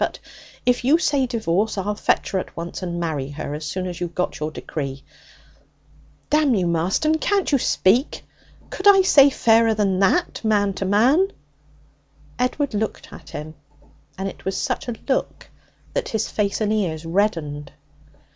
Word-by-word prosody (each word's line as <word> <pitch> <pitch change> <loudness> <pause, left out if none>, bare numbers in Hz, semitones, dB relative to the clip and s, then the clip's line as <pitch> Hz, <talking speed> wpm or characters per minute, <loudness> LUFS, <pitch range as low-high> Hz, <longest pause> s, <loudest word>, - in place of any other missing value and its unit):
But - - -2 0.5
if 245 0 +2
you 280 +6 +5
say 285 -6 +1
divorce, 220 -3 -1
I'll 200 +2 -1
fetch 205 - 0
her 190 - 0
at - - -8
once, 170 +3 -6
and 175 -2 -4
marry 150 -5 -2
her 145 0 -6
as 150 +1 -5
soon 185 +2 -3
as 180 -1 -6
you've 175 -1 -4
got 180 - -2
your 155 0 -2
decree. 140 -3 -6 1.3
Damn 300 -4 +3
you, 185 -3 +1
Marston! 185 - +1
Can't 400 -1 +1
you 280 - +3
speak? 235 +5 +1 0.5
Could 380 - -1
I 390 -1 +7
say 285 -6 +7
fairer 225 -3 +3
than 195 -3 +1
that, 345 - +1
man 205 -2 +2
to 190 - -4
man?' 250 - +4 1.1
Edward 250 +2 0
looked 215 +1 -3
at - - -12
him, 155 +1 -7 0.6
and 195 +1 -3
it - - -9
was 190 0 -2
such 255 -3 -2
a 240 - -3
look 270 - -2 0.4
that - - -2
his 220 -1 -1
face 205 0 -1
and 215 0 +1
ears 170 -7 -2
reddened. 165 -6 -1
205 Hz, 165 wpm, -22 LUFS, 170-255 Hz, 1.3 s, I